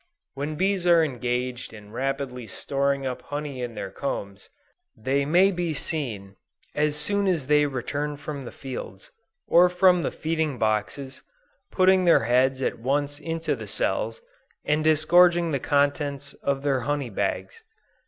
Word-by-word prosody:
When 145 Hz, +3 st, -4 dB
bees 190 Hz, +1 st, 0 dB
are 170 Hz, -1 st, +6 dB
engaged 125 Hz, -3 st, -3 dB
in 105 Hz, -1 st, -12 dB
rapidly 130 Hz, -1 st, -3 dB
storing 140 Hz, +5 st, -1 dB
up 125 Hz, -1 st, -3 dB
honey 145 Hz, -1 st, -5 dB
in 120 Hz, -2 st, -5 dB
their 95 Hz, -, -5 dB
combs, 100 Hz, -8 st, -5 dB, 0.5 s
they 140 Hz, +1 st, 0 dB
may 180 Hz, +6 st, +4 dB
be 175 Hz, -4 st, -2 dB
seen, 110 Hz, -11 st, -3 dB, 0.4 s
as 150 Hz, 0 st, +1 dB
soon 200 Hz, +7 st, +1 dB
as 170 Hz, -7 st, 0 dB
they 150 Hz, +1 st, +4 dB
return 145 Hz, +3 st, -3 dB
from 145 Hz, -1 st, -6 dB
the 125 Hz, -, -8 dB
fields, 130 Hz, -2 st, -8 dB, 0.3 s
or 180 Hz, +1 st, +5 dB
from 180 Hz, 0 st, +4 dB
the -, -, -1 dB
feeding 160 Hz, -3 st, -2 dB
boxes, 110 Hz, +5 st, -2 dB, 0.5 s
putting 185 Hz, 0 st, +4 dB
their 170 Hz, -8 st, +5 dB
heads 130 Hz, +3 st, +2 dB
at 120 Hz, -, -1 dB
once 145 Hz, +4 st, -1 dB
into 165 Hz, 0 st, -2 dB
the -, -, -8 dB
cells, 475 Hz, -, -2 dB, 0.4 s
and 150 Hz, +1 st, +1 dB
disgorging 170 Hz, +2 st, +4 dB
the 140 Hz, -, 0 dB
contents 140 Hz, 0 st, 0 dB
of 140 Hz, 0 st, -1 dB
their 140 Hz, -2 st, +1 dB
"honey 140 Hz, 0 st, -2 dB
bags." 95 Hz, -1 st, -3 dB
145 Hz, 150 wpm, -25 LUFS, 125-160 Hz, 0.5 s, are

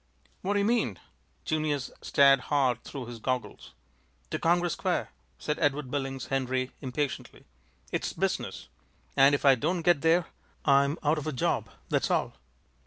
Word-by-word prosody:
"What 200 Hz, -, 0 dB
do 205 Hz, -, +2 dB
you 200 Hz, -, +2 dB
mean?" 220 Hz, -, +1 dB, 0.5 s
Junius 155 Hz, -4 st, -1 dB
stared 140 Hz, -2 st, +5 dB
hard 130 Hz, -5 st, +2 dB
through 135 Hz, -4 st, -7 dB
his 120 Hz, -1 st, -8 dB
goggles. 130 Hz, +2 st, -4 dB, 0.6 s
"To -, -, -2 dB
Congress 175 Hz, 0 st, +2 dB
Square," 180 Hz, 0 st, -1 dB, 0.3 s
said 150 Hz, -, -3 dB
Edward 145 Hz, -2 st, 0 dB
Billings 135 Hz, -2 st, -3 dB
Henry, 130 Hz, -1 st, -1 dB
impatiently. 140 Hz, +1 st, -4 dB, 0.5 s
"It's -, -, -1 dB
business, -, -, -2 dB, 0.5 s
and 140 Hz, +1 st, +6 dB
if 145 Hz, -, -3 dB
I 135 Hz, -, +8 dB
don't 165 Hz, +7 st, -1 dB
get 175 Hz, -4 st, +4 dB
there 165 Hz, +2 st, +3 dB, 0.4 s
I'm 140 Hz, +2 st, +4 dB
out 150 Hz, +1 st, +2 dB
of 150 Hz, -, -6 dB
a -, -, 0 dB
job, 125 Hz, -, -1 dB, 0.2 s
that's -, -, +1 dB
all." -, -, 0 dB
145 Hz, 155 wpm, -28 LUFS, 135-160 Hz, 0.6 s, I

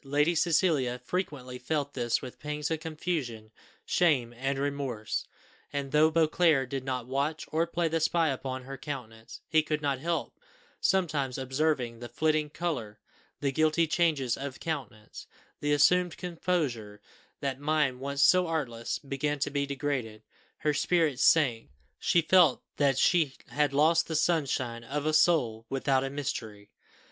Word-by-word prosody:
Lady 145 Hz, +4 st, +2 dB
Cecilia 155 Hz, -7 st, +2 dB
frequently 135 Hz, -9 st, -4 dB
felt 145 Hz, +2 st, -2 dB
this 120 Hz, -2 st, 0 dB
with 125 Hz, -, -9 dB
pangs 150 Hz, +1 st, -3 dB
of 160 Hz, -, 0 dB
confusion, 150 Hz, -9 st, -4 dB, 0.3 s
shame, 135 Hz, -9 st, +2 dB
and 135 Hz, +3 st, -2 dB
remorse; 135 Hz, -6 st, -3 dB, 0.4 s
and, 140 Hz, -1 st, -3 dB
though 155 Hz, +1 st, +5 dB
Beauclerc 160 Hz, -4 st, +2 dB
did 135 Hz, -2 st, -3 dB
not 130 Hz, -2 st, -3 dB
watch, 140 Hz, +5 st, -2 dB
or 165 Hz, +2 st, +1 dB
play 170 Hz, 0 st, 0 dB
the 165 Hz, 0 st, 0 dB
spy 165 Hz, 0 st, +2 dB
upon 130 Hz, -1 st, -4 dB
her 135 Hz, +1 st, -8 dB
countenance, 120 Hz, -6 st, -8 dB
he 155 Hz, 0 st, +4 dB
could 155 Hz, -1 st, -2 dB
not 140 Hz, -3 st, -1 dB
help 165 Hz, +1 st, -2 dB, 0.4 s
sometimes 150 Hz, -9 st, 0 dB
observing 130 Hz, -3 st, -1 dB
the 120 Hz, 0 st, -8 dB
flitting 155 Hz, -1 st, +1 dB
colour 135 Hz, -10 st, -4 dB, 0.4 s
the 140 Hz, -, +1 dB
guilty 155 Hz, +3 st, +2 dB
changes 155 Hz, -7 st, +1 dB
of 140 Hz, -1 st, -6 dB
countenance 125 Hz, -10 st, -6 dB, 0.3 s
the 145 Hz, -, -1 dB
assumed 175 Hz, +4 st, +3 dB
composure: 155 Hz, -, -2 dB, 0.4 s
that 135 Hz, -1 st, -3 dB
mind, 145 Hz, -3 st, +1 dB
once 140 Hz, +1 st, 0 dB
so 180 Hz, +2 st, +5 dB
artless, 130 Hz, -8 st, -2 dB
began 145 Hz, +1 st, -2 dB
to 145 Hz, +1 st, -2 dB
be 140 Hz, 0 st, -1 dB
degraded 130 Hz, -6 st, -3 dB, 0.3 s
her 150 Hz, 0 st, 0 dB
spirits 155 Hz, -4 st, +1 dB
sank; 125 Hz, -, +3 dB, 0.3 s
she 170 Hz, -, +2 dB
felt 170 Hz, -5 st, +4 dB
that 140 Hz, -3 st, +2 dB
she 155 Hz, -3 st, +3 dB
"had 145 Hz, +3 st, +1 dB
lost 160 Hz, +4 st, +3 dB
the 160 Hz, -, -3 dB
sunshine 135 Hz, -8 st, 0 dB
of 140 Hz, +5 st, -3 dB
a 155 Hz, -, +1 dB
soul 125 Hz, -9 st, +2 dB
without 135 Hz, 0 st, +1 dB
a 135 Hz, -, -2 dB
mystery!" 115 Hz, -8 st, -5 dB
145 Hz, 150 wpm, -29 LUFS, 130-160 Hz, 0.4 s, though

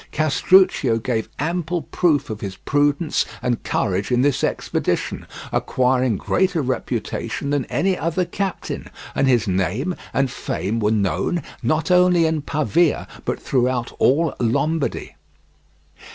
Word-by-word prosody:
Castruccio 155 Hz, -4 st, +3 dB
gave 115 Hz, -1 st, -2 dB
ample 170 Hz, +2 st, -2 dB
proof 150 Hz, -6 st, +1 dB
of 105 Hz, -, -6 dB
his 95 Hz, -2 st, -5 dB
prudence 145 Hz, +2 st, +1 dB, 0.2 s
and 120 Hz, -2 st, -1 dB
courage 100 Hz, +3 st, -1 dB
in 125 Hz, +1 st, +3 dB
this 145 Hz, -2 st, +1 dB
expedition, -, -, -1 dB, 0.2 s
acquiring 125 Hz, -3 st, +1 dB
greater 185 Hz, -, +1 dB
reputation 130 Hz, +2 st, -3 dB
than 145 Hz, -3 st, 0 dB
any 190 Hz, 0 st, 0 dB
other 175 Hz, +2 st, -1 dB
captain, 195 Hz, +1 st, -4 dB, 0.2 s
and 135 Hz, -, +1 dB
his 120 Hz, -4 st, +3 dB
name 95 Hz, -, 0 dB, 0.2 s
and 135 Hz, -2 st, +1 dB
fame 105 Hz, +5 st, -3 dB
were 105 Hz, -1 st, +2 dB
known, 110 Hz, -, 0 dB, 0.2 s
not 155 Hz, +2 st, 0 dB
only 180 Hz, -2 st, +5 dB
in 160 Hz, -1 st, 0 dB
Pavia, 155 Hz, +3 st, +1 dB, 0.2 s
but -, -, -2 dB
throughout 125 Hz, -2 st, 0 dB
all 155 Hz, +4 st, +3 dB
Lombardy. 140 Hz, +6 st, 0 dB
140 Hz, 125 wpm, -21 LUFS, 120-165 Hz, 0.2 s, only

